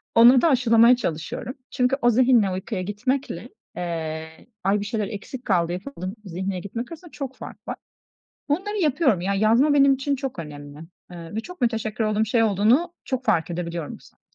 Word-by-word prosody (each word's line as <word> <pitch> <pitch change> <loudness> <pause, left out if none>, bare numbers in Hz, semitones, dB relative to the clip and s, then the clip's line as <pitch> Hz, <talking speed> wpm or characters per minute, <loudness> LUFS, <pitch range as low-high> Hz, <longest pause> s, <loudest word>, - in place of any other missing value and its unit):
ona 240 +2 +8
da 330 - +4
aşılamaya 235 -2 +5
çalışıyorum. 175 - -4 0.2
Çünkü 255 0 +1
o 240 - +5
zihinle 240 -4 +4
uykuya 185 +2 -3
gitmekle, 210 +1 -3 0.3
eee, 160 -2 -5 0.2
ay 195 +2 +2
bir 205 - -4
şeyler 210 -1 -2
eksik 230 +5 -8
kaldı 175 -4 +2
yapamadım 185 -1 -6
zihniyle 190 +1 -3
gitmek 230 - -6
arasında 330 0 -10
çok 270 -2 -6
fark - - -11
var. - - -3 0.7
Bunları 390 +8 -1
yapıyorum, 285 - +2
ya, 195 +3 -1
yazma 230 +9 +4
benim 275 -1 +6
için 275 +1 -1
çok 265 -6 -5
önemli, 145 -2 -8 0.3
eee, 170 +1 -9
ve 220 - -1
çok 360 +5 -11
müteşekkir 225 -2 0
olduğum 215 0 +1
şey 225 +2 +2
olduğunu 225 - +3
çok 260 -1 -3
fark 165 +1 +1
edebiliyorum 170 -2 -4
bu - - -27
sayede. - - -23
220 Hz, 175 wpm, -24 LUFS, 185-260 Hz, 0.7 s, ona